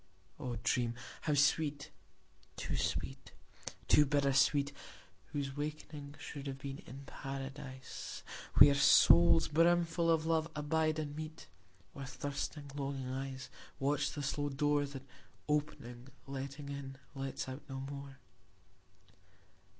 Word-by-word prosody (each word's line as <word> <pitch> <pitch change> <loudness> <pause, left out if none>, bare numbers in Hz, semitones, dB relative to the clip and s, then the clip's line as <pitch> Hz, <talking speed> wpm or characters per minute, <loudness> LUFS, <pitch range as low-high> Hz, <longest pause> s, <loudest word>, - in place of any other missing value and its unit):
O 120 -2 -3
dream 120 -1 +1 0.3
how 150 - +3
sweet, 145 0 +2 0.6
too - - -3
sweet, - - -2 0.5
too 150 - +7
bitter 140 -1 +2
sweet, 140 +1 +3 0.5
Whose 140 -2 -3
wakening 145 -1 -5
should 140 -1 -7
have 135 -1 -4
been 135 +1 -6
in 135 +4 -9
Paradise, 135 -1 -7 0.3
Where 145 - +9
souls 140 - +7
brimfull 170 +1 +3
of 160 -1 +3
love 160 0 +2
abide 155 +1 +1
and 150 -2 -3
meet; 155 - -7 0.5
Where 135 -1 -6
thirsting 140 +2 -4
longing 135 -2 -3
eyes 130 -1 -5 0.3
Watch 140 +1 +1
the 145 - -4
slow 145 +1 -1
door 145 +1 +2
That 135 -1 -8 0.4
opening, 135 -5 -2 0.2
letting 140 +1 -6
in, 140 -1 -6 0.2
lets 135 -1 -4
out 130 +2 -6
no 135 0 -4
more. 140 0 -7
140 Hz, 120 wpm, -35 LUFS, 135-150 Hz, 0.6 s, Where